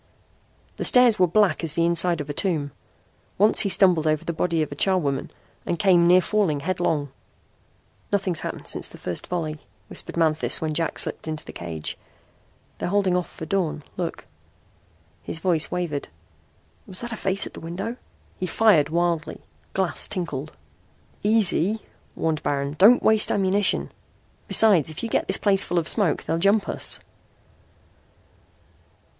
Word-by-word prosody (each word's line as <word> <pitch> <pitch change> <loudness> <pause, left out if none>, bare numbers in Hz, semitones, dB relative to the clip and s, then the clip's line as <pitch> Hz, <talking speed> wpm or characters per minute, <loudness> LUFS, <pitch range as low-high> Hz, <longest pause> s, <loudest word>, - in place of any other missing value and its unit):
The - - -3
stairs 245 -3 +5
were 180 - +5
black 205 0 +2
as 155 -2 0
the 170 - +2
inside 170 -1 +1
of 145 - -7
a - - -5
tomb. 150 -4 -1 0.7
Once 210 +3 +5
he 200 - +3
stumbled 180 -5 +3
over 155 -1 0
the 170 - -2
body 165 -1 0
of 150 - -6
a - - -5
charwoman 150 -9 0 0.3
and 170 - -2
came 180 -3 +4
near 180 +1 +6
falling 180 -7 0
headlong. 160 -5 -1 1.0
"Nothing's 190 -5 +1
happened - - -6
since - - -1
that - - -12
first 90 - -4
volley," 155 -4 -3 0.3
whispered - - -6
Manthis 160 -2 +1
when 155 -1 -2
Jack 165 +1 -1
slipped - - -1
into 155 -1 -4
the - - -10
cage. 80 -3 -5 0.8
"They're - - -2
holding 195 -2 +1
off 180 -1 -1
for 160 - -8
dawn. 160 -4 -2
Look!" 175 -2 -5 1.0
his - - -6
voice 165 -2 0
wavered. 170 -5 -3 0.8
"Was 185 - -1
that 240 0 -6
a - - -3
face 195 -2 +1
at - - -9
the - - -9
window?" 195 +8 -5 0.4
He 185 - -2
fired 175 -7 +4
wildly. 170 -1 -1 0.3
Glass 190 -3 0
tinkled. 160 -7 -4 0.7
"Easy," 210 -1 +2 0.3
warned 160 -1 -1
Baron. 140 0 -2
"Don't 225 +6 +6
waste 220 -1 +3
ammunition. 195 0 +1 0.6
Besides, 195 -10 +4
if 155 - -8
you 230 - -2
get - - 0
this - - 0
place 195 -2 +2
full 175 - -3
of 165 -1 +1
smoke 200 -6 +1
they'll 165 - -2
jump 200 +3 +3
us." - - 0
175 Hz, 160 wpm, -24 LUFS, 155-195 Hz, 1.0 s, near